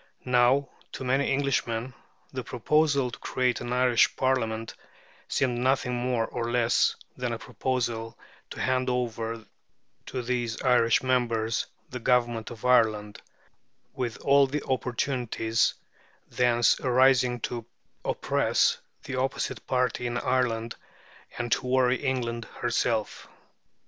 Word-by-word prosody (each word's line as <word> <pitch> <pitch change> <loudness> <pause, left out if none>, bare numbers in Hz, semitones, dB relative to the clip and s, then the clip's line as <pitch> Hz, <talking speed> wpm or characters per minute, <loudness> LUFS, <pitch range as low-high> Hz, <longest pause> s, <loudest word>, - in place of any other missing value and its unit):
Now, 125 +3 +3 0.3
to - - -6
many 135 +2 +1
Englishmen, 130 -3 -1 0.4
the 130 -1 -4
proposal 140 +2 +1
to - - -9
create 125 -1 0
an 120 0 -5
Irish 125 -1 +3
Parliament 115 -4 -1 0.5
seemed 125 -3 0
nothing 130 0 +1
more 120 -1 0
or 120 0 -4
less 120 -1 +2 0.2
than - - -3
a - - -3
proposal 115 -3 -3 0.3
to - - -8
hand 130 0 +1
over 115 -2 -2 0.6
to 130 -2 -4
these 120 -2 -2
Irish 120 -3 +4
members 115 -3 0 0.2
the 125 - -6
government 120 -2 +1
of 120 +1 -9
Ireland, 110 -4 +2 0.7
with 125 -4 -3
all 140 0 +5
the 145 +2 -3
opportunities 120 -2 0 0.5
thence 120 -1 +3
arising 125 -1 +3
to 120 -1 -4 0.4
oppress - - +1 0.2
the 135 - -5
opposite 130 +1 -2
party 125 -1 0
in 120 0 -2
Ireland 120 -3 0 0.6
and 120 -1 -3
to 125 - +1
worry 125 0 +3
England 120 -3 -1
herself. 115 -2 -2
125 Hz, 120 wpm, -27 LUFS, 115-130 Hz, 0.7 s, all